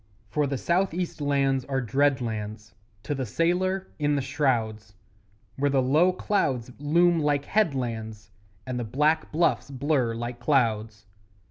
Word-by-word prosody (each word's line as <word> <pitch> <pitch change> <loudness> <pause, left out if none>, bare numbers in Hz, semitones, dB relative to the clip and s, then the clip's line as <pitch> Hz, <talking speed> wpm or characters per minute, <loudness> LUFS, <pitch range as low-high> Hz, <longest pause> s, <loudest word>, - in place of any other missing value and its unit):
For 150 -1 +1
the 140 -1 -2
South 175 +4 0
east 175 -3 -3
lands 135 -2 +1
are 135 -1 -1
dread 135 +3 +1
lands 110 -1 -5 0.3
To 145 - -2
the 135 -2 -2
sailor 180 - 0
in 145 -1 +1
the 140 - 0
shrouds, 115 -7 -1 0.6
Where 140 +1 +1
the 135 -2 +2
low 155 +8 +4
clouds 135 - -1
loom 170 +4 +3
like 145 -2 +1
headlands, 115 - -2 0.3
And 125 -1 -3
the - - -2
black 150 +8 +1
bluffs 165 -2 +1
blur 135 -3 0
like 120 +1 -5
clouds. 110 -5 0
135 Hz, 145 wpm, -26 LUFS, 120-155 Hz, 0.6 s, low